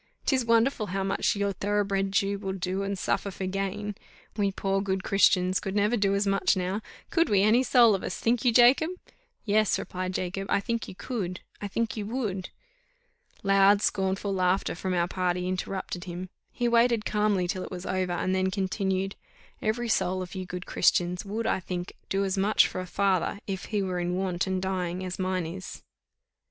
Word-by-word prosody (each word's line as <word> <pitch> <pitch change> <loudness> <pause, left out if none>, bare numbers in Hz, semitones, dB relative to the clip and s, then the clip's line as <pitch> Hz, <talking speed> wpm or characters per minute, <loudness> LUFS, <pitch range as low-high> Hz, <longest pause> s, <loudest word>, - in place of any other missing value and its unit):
'Tis 260 -3 +2
wonderful 230 0 +2
how 195 +1 -2
much 195 +2 +1
your 200 0 0
thoroughbred 200 0 0
Jew 200 0 +1
will 195 -1 -3
do 190 +1 -2
and 200 0 -2
suffer 200 - -1
for 190 0 -5
gain. 195 +2 -3 0.4
We 200 -2 +1
poor 195 0 -1
good 190 -1 -1
Christians 185 -2 +3
could 195 0 -4
never 210 +3 +2
do 200 -3 +2
as 200 +1 +1
much 195 0 +2
now 185 +3 -1 0.3
could 335 0 +2
we 200 -2 +4
any 220 +4 +5
soul 245 -4 +5
of 195 - -1
us, - - -4
think 235 0 +1
you, 245 - +4
Jacob?" 250 +7 +6 0.6
"Yes," 215 0 +3
replied 185 0 -4
Jacob, 195 +2 -3
"I - - +3
think 230 +2 -3
you - - -9
could, 190 -6 -4 0.2
I 205 - -3
think 230 +3 -2
you 210 -2 -4
would." 210 -6 -3 0.9
Loud 195 +1 +5
scornful 195 +1 0
laughter 185 0 +1
from 185 +2 -2
our 170 0 +2
party 180 0 -1
interrupted 185 -1 -3
him; 180 +1 -6 0.2
he 240 - -1
waited 235 -2 +3
calmly 210 -4 +1
till 185 +1 -2
it - - -7
was 180 -1 -7
over, 185 -1 -1
and 185 +1 -1
then 190 0 +1
continued, 190 0 -1 0.5
"Every 235 +2 -1
soul 185 -4 +1
of 180 - -10
you 185 -2 -5
good 180 0 -6
Christians 180 0 +2
would, 220 +3 -3
I - - +1
think, 180 0 -5 0.2
do 195 0 +1
as 190 0 -1
much 205 +3 +4
for 185 - -5
a 185 - -7
father, 195 0 +1
if 190 -2 -4
he 210 -3 -1
were 185 -1 -2
in 175 0 -1
want 185 0 -1
and 190 0 0
dying, 185 -1 -2
as 185 +1 -5
mine 185 -2 -1
is." 185 +4 -7
195 Hz, 195 wpm, -27 LUFS, 185-205 Hz, 0.9 s, Jacob